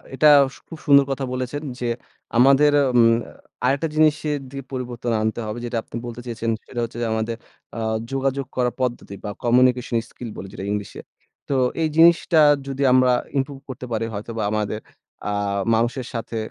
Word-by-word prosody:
এটা 150 - +5 0.3
সু - - -16
খুব 165 - -9
সুন্দর 140 -1 +6
কথা 135 0 -2
বলেছেন 130 +3 -3 0.2
যে 120 - -2 0.5
আমাদের 140 +4 +6 0.2
উম 120 - +6 0.6
আরেকটা 140 +5 +1
জিনিসের 150 -1 +2
দি 140 - -8
পরিবর্তন 125 -2 -4
আনতে 110 +1 -1
হবে 105 +2 -4
যেটা 120 0 -3
আপনি - - -12
বলতে 120 0 -7
চেয়েছেন 115 -1 -2 0.2
সেটা 120 - -5
হচ্ছে 115 +1 -6
যে, - - 0
আমাদের 110 +1 -1 0.4
আ - - -3 0.3
যোগাযোগ 135 0 -1
করার 125 -1 +1
পদ্ধতি 120 -5 -2
বা 105 - -4
কমিউনিকেশন 125 0 +3
স্কিল 120 - -8
বলি 95 - -7
যেটা 95 - -6
ইংলিশে। 105 -2 -4 0.5
তো 140 - +1 0.3
এই 160 - +3
জিনিসটা 165 0 +5 0.3
যদি 135 0 -2
আমরা 130 0 +5 0.3
ইমপ্রুভ 135 0 -2
করতে 130 -1 -6
পারি 115 0 -1
হয়তো 105 +3 -6
বা 110 - -1
আমাদের 105 0 -1 0.5
আ - - -1 0.4
মানুষের 120 +2 -1
সাথে 115 -1 -4
125 Hz, 170 wpm, -22 LUFS, 115-140 Hz, 0.6 s, সুন্দর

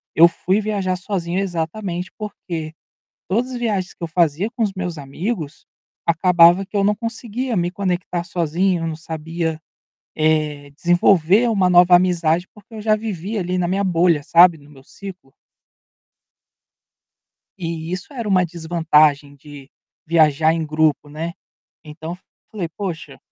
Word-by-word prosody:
eu 165 +2 +8
fui 185 +3 0
viajar 200 -3 -1
sozinho 180 -2 -3
exatamente 180 0 -3
porque, 170 -7 -6 0.6
todas 240 +7 -1
viagens 210 -6 -2
que - - -18
eu - - -4
fazia 170 +3 +1
com 235 - -1
os 210 -3 0
meus 180 -3 -4
amigos, 155 - -5 0.4
acabava 170 +2 +5
que 205 - -6
eu 200 - +2
não 210 +1 +3
conseguia 230 +2 -4
me 175 -1 0
conectar 180 -2 -2
sozinho, 175 +1 0
eu - - -2
não 160 -1 -4
sabia, 160 0 -4 0.6
eh, 155 -2 0
desenvolver 175 +6 +3
uma 195 -5 +2
nova 180 0 +7
amizade, 175 -1 +2
porque 210 +1 -18
eu 215 - -6
já 215 0 +3
vivi 210 -1 -4
ali 180 -1 -2
na 180 -1 0
minha 195 +3 0
bolha, 170 -4 +2
sabe, 170 +2 +6
no 145 0 -18
meu 135 -2 -16
ciclo. 185 -6 -11 2.2
E 165 -2 -5
isso 185 +10 -6
era 235 -5 -4
uma 185 -3 +3
desvantagem 155 -4 +2
de 140 -1 -13 0.4
viajar 160 -1 +3
em 165 -1 -2
grupo, 155 -1 +1
né. 160 +3 -5 0.5
Então, 160 +3 -7 0.3
falei 190 -6 -4
poxa, 165 -5 -6
175 Hz, 145 wpm, -20 LUFS, 160-195 Hz, 2.2 s, eu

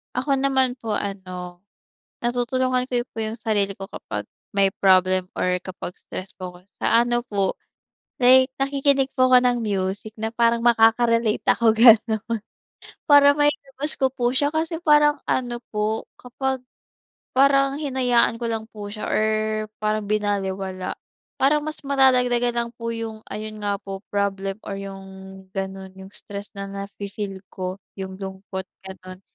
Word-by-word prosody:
Ako 270 +3 +1
naman 265 -2 +3
po 220 -2 -1
ano 185 -3 -6 0.6
natutulungan 250 +1 0
ko 245 -1 0
po - - -15
yung 220 +2 -4
sarili 205 -3 +1
ko 195 - -6
kapag - - -6 0.3
may 195 -1 +4
problem 185 -1 +4
or 180 0 +1
kapag 185 -1 -7
stress 185 +1 -7
po 185 -1 -5
ako, - - -14 0.2
sa - - +1 0.2
ano 240 0 +1
po 195 -2 +1 0.7
like 260 +1 +7
nakikinig 275 0 +2
po 255 -1 +4
ako 255 - +9
ng 245 -1 +3
music 200 +1 -2
na 220 +1 -3
parang 235 0 +2
makaka-relate 230 -1 +4
ako 230 -2 +3
gano'n. 225 -2 +6 0.8
Parang 285 0 +8
mailabas 290 0 0
ko 265 -2 +2
po 245 -2 0
siya 285 +2 +2
kasi 320 +1 -1
parang 295 -2 +5
ano 240 -2 0
po 215 +1 -1
kapag 260 +1 -3 0.7
parang 275 0 +4
hinayaan 250 -5 +2
ko - - -1
lang 225 -1 -3
po 205 -1 -7
siya 215 0 -5
or 215 - +2 0.6
parang 215 0 0
binalewala, 195 -3 -2 0.5
parang 295 +3 +4
mas 310 0 -5
madadagdagan 250 -3 +3
lang 235 0 0
po 230 0 -4
yung, 225 -1 -6
ayun 215 0 -6
nga 200 -1 0
po, 195 -1 -7
problem 195 -1 -1
or 200 - -3
yung 195 -1 -7 0.5
ganun, 190 0 -5
yung 190 0 -12
stress 200 0 -8
na 200 0 -5
nafi-feel 200 0 -6
ko. 185 0 -4 0.2
Yung 190 -1 -6
lungkot, 190 -1 -6 0.2
gano'n, 185 -1 -10
220 Hz, 145 wpm, -23 LUFS, 195-255 Hz, 0.8 s, ako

